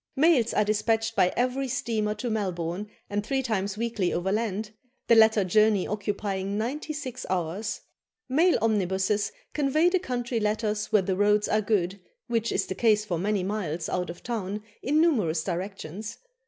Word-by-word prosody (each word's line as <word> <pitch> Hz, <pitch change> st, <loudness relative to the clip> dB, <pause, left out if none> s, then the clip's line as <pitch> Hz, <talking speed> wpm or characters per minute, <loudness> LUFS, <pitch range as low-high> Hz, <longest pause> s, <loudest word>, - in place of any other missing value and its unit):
Mails 280 Hz, -5 st, +4 dB
are 210 Hz, -, +3 dB
despatched 225 Hz, +1 st, +1 dB
by 180 Hz, -, +4 dB
every 255 Hz, +2 st, 0 dB
steamer 220 Hz, -4 st, -1 dB
to 245 Hz, -, -3 dB
Melbourne, 185 Hz, -1 st, -2 dB, 0.2 s
and 205 Hz, 0 st, -2 dB
three 265 Hz, +4 st, -1 dB
times 205 Hz, -4 st, -1 dB
weekly 225 Hz, -5 st, -1 dB
overland, 210 Hz, +3 st, -1 dB, 0.3 s
the -, -, +4 dB
latter 220 Hz, -2 st, +6 dB
journey 210 Hz, +1 st, +3 dB
occupying 200 Hz, -1 st, -2 dB
ninety 270 Hz, +8 st, -3 dB
six 285 Hz, -5 st, -5 dB
hours. 185 Hz, +4 st, -2 dB, 0.5 s
Mail 320 Hz, +7 st, +4 dB
omnibuses 205 Hz, -1 st, +1 dB, 0.2 s
convey 305 Hz, +4 st, +3 dB
the 375 Hz, +1 st, +2 dB
country 245 Hz, -6 st, -2 dB
letters 210 Hz, 0 st, -1 dB
where 210 Hz, -3 st, +4 dB
the 185 Hz, 0 st, 0 dB
roads 210 Hz, +1 st, +3 dB
are 215 Hz, -, +2 dB
good, 200 Hz, -2 st, 0 dB, 0.3 s
which 230 Hz, -1 st, 0 dB
is -, -, 0 dB
the -, -, -4 dB
case 215 Hz, 0 st, +3 dB
for 175 Hz, -5 st, -2 dB
many 200 Hz, +1 st, 0 dB
miles 175 Hz, -5 st, -3 dB
out 180 Hz, 0 st, -1 dB
of 170 Hz, -, -9 dB
town 210 Hz, -3 st, -3 dB, 0.2 s
in 295 Hz, +3 st, +2 dB
numerous 210 Hz, -, +2 dB
directions. 195 Hz, +3 st, -5 dB
210 Hz, 160 wpm, -27 LUFS, 190-230 Hz, 0.5 s, latter